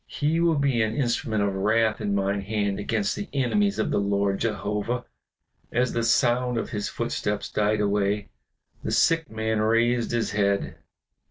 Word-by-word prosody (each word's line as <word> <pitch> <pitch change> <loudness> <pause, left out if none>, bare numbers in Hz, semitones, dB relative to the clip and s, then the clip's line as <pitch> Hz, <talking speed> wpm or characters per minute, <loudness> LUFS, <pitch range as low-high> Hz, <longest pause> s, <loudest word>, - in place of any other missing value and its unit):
He 155 +3 0
will 170 -1 +3
be 140 -4 +2
an 110 0 0
instrument 120 -4 0
of 100 -1 0
wrath 110 +3 +1
in 100 -1 0
mine 100 0 0
hand 100 -1 -1
against 105 -1 -1
the 205 - -6
enemies 200 +10 +1
of - - 0
the - - +2
Lord 100 -1 0
Jehovah." 105 +2 -2 0.7
As 125 +1 +1
the 120 - 0
sound 120 +1 +2
of 115 - -3
his 105 -1 -2
footsteps - - -3
died 105 0 +1
away, 100 0 0 0.5
the - - -3
sick 165 -3 +2
man 110 0 -1
raised 115 +2 +2
his 120 -1 -1
head. 100 -1 0
110 Hz, 165 wpm, -25 LUFS, 100-125 Hz, 0.7 s, will